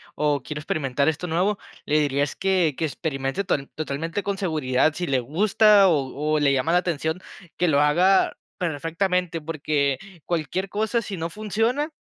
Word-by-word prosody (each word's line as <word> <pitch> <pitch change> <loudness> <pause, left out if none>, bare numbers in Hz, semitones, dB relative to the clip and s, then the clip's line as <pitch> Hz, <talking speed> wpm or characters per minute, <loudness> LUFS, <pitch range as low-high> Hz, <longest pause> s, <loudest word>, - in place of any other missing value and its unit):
o 145 -2 +1
quiero 150 -1 -5
experimentar 140 -2 -1
esto 160 +3 0
nuevo", 185 +5 +1 0.3
le 150 +1 +2
diría 145 -1 +1
es 145 - -3
que 185 -6 +1
que 160 - 0
experimente 140 +3 -3
total 140 -7 -1
totalmente 160 +5 -3
con 200 -1 -2
seguridad. 155 -6 +1
Si 175 +2 -3
le 135 -3 +2
gusta, 200 - +4
o 150 0 0
o - - +2
le 145 -1 +3
llama 135 +5 +1
la - - +5
atención, 160 -1 -2 0.4
que 180 - +2
lo 140 -2 +3
haga 180 +6 +3 0.2
perfectamente, 170 +2 -1
porque 150 -3 0 0.3
cualquier 170 +3 -2
cosa, 220 +3 0
si 200 -2 -6
no 165 0 -3
funciona, 225 - -1
160 Hz, 170 wpm, -24 LUFS, 145-190 Hz, 0.4 s, la